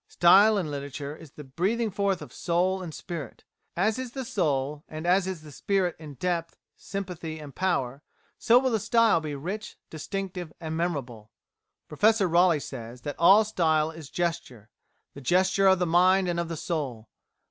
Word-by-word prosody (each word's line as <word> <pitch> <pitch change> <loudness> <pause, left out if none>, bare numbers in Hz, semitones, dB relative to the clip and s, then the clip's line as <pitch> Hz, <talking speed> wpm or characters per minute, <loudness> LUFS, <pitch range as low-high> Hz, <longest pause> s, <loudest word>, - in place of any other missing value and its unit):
Style 200 +5 +5
in 165 -6 -2
literature 140 +1 -6
is 155 -3 -14
the 150 - -10
breathing 200 - -1
forth 200 -2 -1
of - - -13
soul 185 +2 0
and 175 -3 -6
spirit; 155 -5 -7 0.3
as 215 +6 +1
is 255 -2 -6
the 265 -2 -5
soul, 145 -7 -1
and 155 +1 -7
as 185 +2 +3
is 185 -5 -5
the 150 - -11
spirit 185 +3 0
in 150 -3 -10
depth, 170 +3 -2 0.2
sympathy, 180 -5 -6
and 150 -3 -10
power, 140 -8 -1 0.4
so 235 0 +5
will 260 0 +2
the 220 - +1
style 230 -4 +3
be 150 -2 -5
rich, 190 +10 -6
distinctive, 180 +1 -5
and 160 -2 -5
memorable. 135 -11 -3 0.6
Professor 210 +4 +3
Raleigh 175 -1 +4
says 120 -3 -8
that 145 +3 -4
"All 200 +6 +7
style 160 -6 +1
is 160 -3 -11
gesture 130 -12 -4 0.4
the 140 - -10
gesture 190 +6 +3
of 190 0 +6
the 180 - 0
mind 180 +3 +4
and 175 -1 -1
of 170 - -2
the 165 -1 -5
soul. 140 -9 -4
170 Hz, 175 wpm, -27 LUFS, 150-190 Hz, 0.6 s, All